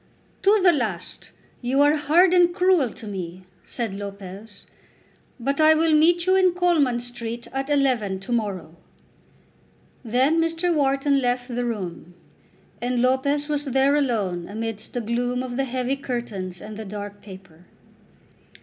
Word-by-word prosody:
"To 415 +2 +4
the 355 -2 +6
last 215 - -3 0.3
you 260 +3 +1
are 295 +1 +4
hard 330 +5 +4
and 350 -1 +5
cruel 365 -8 +3
to 225 - -11
me," 185 -3 -6 0.2
said 230 -5 -4
Lopez; 200 +1 -9 0.7
"but 275 +5 0
I 310 0 +6
will 320 0 +2
meet 340 +3 +4
you 375 0 +4
in 370 -2 +4
Coleman 320 -9 +2
Street 240 -1 -6
at 270 +1 -3
eleven 250 -9 +1
to 220 - -8
morrow." 195 -8 -2 1.3
Then 260 +8 +2
Mr. 330 +1 0
Wharton 275 -1 +2
left 245 0 -1
the 245 0 -2
room, 180 -6 -5 0.7
and 245 0 -1
Lopez 265 +4 +1
was 295 -1 -1
there 270 +1 +2
alone 205 -11 -1
amidst 220 0 -5
the 245 - -1
gloom 245 +2 -1
of 250 -1 -5
the 270 +1 0
heavy 255 +1 -2
curtains 215 -9 -5
and 210 0 -8
the 220 - -6
dark 205 0 -7
paper. 190 -4 -14
245 Hz, 150 wpm, -23 LUFS, 210-290 Hz, 1.3 s, the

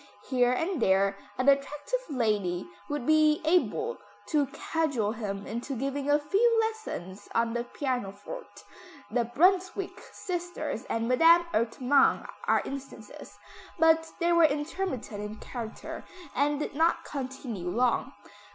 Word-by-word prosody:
Here 250 -1 +4
and 325 +3 -1
there 195 0 +3 0.2
an 255 +2 0
attractive 280 - +2
lady 210 -9 0 0.2
would 290 -4 -2
be 310 0 +4
able 400 +8 +1 0.3
to 295 -3 +2
cajole 285 -6 -1
him 205 -3 -4
into 235 +5 -4
giving 275 +3 -2
a 290 - +6
few 450 +10 +3
lessons 435 - -4
on 230 0 +2
the 240 0 -2
pianoforte 250 - -5 0.5
the 240 -2 +1
Brunswick 370 - +2
sisters 350 - -4
and 230 0 -1
Madame 330 +7 +6
Ertmann 250 +5 +3 0.2
are - - +3
instances, 275 0 -9 0.4
but 325 0 +4
they 345 0 +3
were 340 -1 +6
intermittent 295 - -2
in 210 +1 -5
character, 225 0 -7 0.3
and 290 +2 +1
did 295 - -3
not 325 +4 +2
continue 255 -9 -5
long. 245 +5 +1
275 Hz, 125 wpm, -29 LUFS, 230-325 Hz, 0.5 s, a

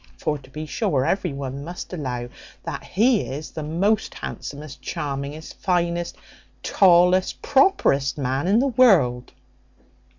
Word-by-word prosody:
for 155 - -1
to 130 - -17
be 155 +3 -6
sure 135 -2 0
every 190 -3 0
one 140 0 -5
must 175 +3 -7
allow 125 -7 -4 0.4
that - - -5
he 225 +2 +2
is 145 +4 -6
the 155 - -6
most 185 +8 0
handsomest, 140 -2 -7
charmingest, 145 +3 -5
finest, 175 -2 -1 0.5
tallest, 180 0 +4
properest 150 - +3
man 135 +3 -1
in 200 +3 +4
the 255 - +3
world." 185 - +3
155 Hz, 130 wpm, -23 LUFS, 140-185 Hz, 0.5 s, tallest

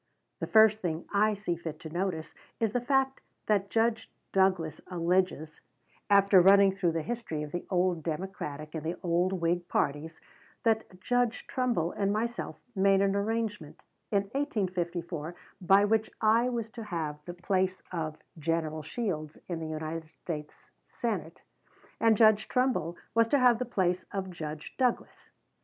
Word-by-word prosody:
The - - -3
first 220 -1 +6
thing 165 -2 -2
I 210 +1 +3
see 195 -4 -2
fit 160 -2 -7
to 160 - -7
notice 175 -3 -2 0.3
is 225 -2 +1
the 245 - +1
fact 270 +1 +1 0.2
that 200 -2 +1
Judge 225 0 +1 0.2
Douglas 185 -5 +1
alleges, 175 -3 0 0.5
after 200 -2 +6
running 195 +1 +7
through 180 -4 +1
the 165 -1 -1
history 225 -10 -4
of 150 - -7
the 175 - -5
old 180 -2 +1
Democratic 155 -2 -5
and 160 -2 -4
the 165 +2 -2
old 175 +1 +2
Whig 175 0 0
parties, 150 +3 -1 0.4
that 220 -5 0
Judge 245 +2 0
Trumbull 240 -11 0
and 200 -1 0
myself 235 +3 -3 0.2
made 195 0 +4
an 200 0 +2
arrangement 205 -5 -2 0.3
in 200 -2 +2
1854 180 - -3 0.3
by 195 +3 +5
which 220 +1 +1
I 230 +3 +4
was 235 -3 -2
to 230 - -7
have 155 -6 -4
the 175 - -7
place 185 +1 0
of 155 -3 -3 0.2
General 155 0 -1
Shields 155 -4 -4
in 175 -2 -3
the 160 - -4
United 155 +1 -4
States 155 -2 -8 0.2
Senate, 180 -9 -4 0.6
and 225 -2 +4
Judge 215 -1 +5
Trumbull 250 -10 0 0.2
was 230 0 +4
to 285 - +3
have 245 -3 +5
the 250 - -1
place 185 -6 0
of 190 -2 -3
Judge 155 -3 -7
Douglas. 250 -2 -1
185 Hz, 155 wpm, -29 LUFS, 165-220 Hz, 0.6 s, running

